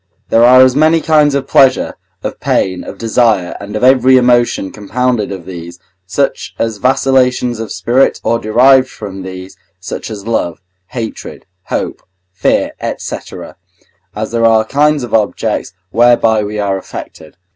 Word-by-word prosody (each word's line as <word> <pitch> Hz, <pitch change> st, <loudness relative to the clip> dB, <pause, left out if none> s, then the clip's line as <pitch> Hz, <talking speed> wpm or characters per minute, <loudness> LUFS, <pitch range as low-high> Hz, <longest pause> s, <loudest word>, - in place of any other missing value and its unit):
There 115 Hz, -, +4 dB
are 130 Hz, +2 st, +7 dB
as 130 Hz, 0 st, +3 dB
many 155 Hz, +3 st, +4 dB
kinds 150 Hz, -3 st, +2 dB
of 140 Hz, -, -1 dB
pleasure, 130 Hz, -2 st, +3 dB, 0.3 s
of -, -, -5 dB
pain, 95 Hz, -1 st, -1 dB
of -, -, -9 dB
desire, 110 Hz, -5 st, +1 dB
and 100 Hz, +1 st, -8 dB
of 110 Hz, -, -3 dB
every 130 Hz, 0 st, +5 dB
emotion 120 Hz, -5 st, +2 dB
compounded 110 Hz, +1 st, -2 dB
of 95 Hz, -4 st, -7 dB
these, 85 Hz, -1 st, -9 dB, 0.3 s
such 95 Hz, -, -2 dB
as 115 Hz, -2 st, -2 dB
vacillations 125 Hz, -2 st, +1 dB
of 115 Hz, -2 st, -6 dB
spirit, 120 Hz, +9 st, +1 dB
or 115 Hz, -, +1 dB
derived 130 Hz, +4 st, +4 dB
from 95 Hz, -3 st, -8 dB
these, 95 Hz, 0 st, -9 dB, 0.2 s
such 95 Hz, -, -6 dB
as 105 Hz, -2 st, -8 dB
love, 100 Hz, -7 st, -2 dB, 0.3 s
hatred, 115 Hz, -1 st, -7 dB, 0.2 s
hope, -, -, -4 dB, 0.3 s
fear, 95 Hz, -, 0 dB, 0.3 s
&c., -, -, -5 dB, 1.0 s
as 110 Hz, +1 st, -4 dB
there 115 Hz, -1 st, +1 dB
are 110 Hz, -1 st, +3 dB
kinds 145 Hz, +2 st, +1 dB
of 120 Hz, -, -7 dB
objects 110 Hz, -4 st, -1 dB, 0.2 s
whereby 115 Hz, -2 st, +3 dB
we 105 Hz, +1 st, -5 dB
are 100 Hz, -2 st, -1 dB
affected. 80 Hz, -3 st, -10 dB
115 Hz, 150 wpm, -14 LUFS, 100-130 Hz, 1.0 s, are